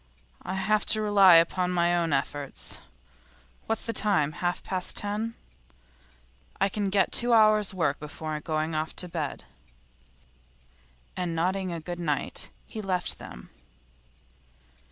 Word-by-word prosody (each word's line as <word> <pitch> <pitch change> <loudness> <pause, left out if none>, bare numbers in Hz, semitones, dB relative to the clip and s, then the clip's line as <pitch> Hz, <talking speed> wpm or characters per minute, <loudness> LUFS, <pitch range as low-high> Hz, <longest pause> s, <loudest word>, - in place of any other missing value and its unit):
I 190 - -5
have 210 +3 +1
to 215 - +4
rely 200 -4 +7
upon 180 +2 +3
my 175 -1 +2
own 170 -2 0
efforts. 140 0 -3 0.9
What's 225 0 -2
the 230 - -2
time? 195 -9 +2
Half 175 +2 -3
past 185 -1 -1
ten; 215 +3 -2 1.2
I - - +2
can 200 0 -2
get 195 0 +2
two 240 0 +3
hours' 215 -2 +5
work 165 -7 -1
before 150 +1 -5
going 155 0 -2
to 155 +3 -2
bed.' 160 -4 -4 1.7
And 175 -2 -2
nodding 185 +2 -1
a 170 - -4
good 175 +2 -6
night 150 -5 -2 0.2
he 220 - -7
left 185 -3 -2
them. - - -11
180 Hz, 130 wpm, -27 LUFS, 160-205 Hz, 1.7 s, rely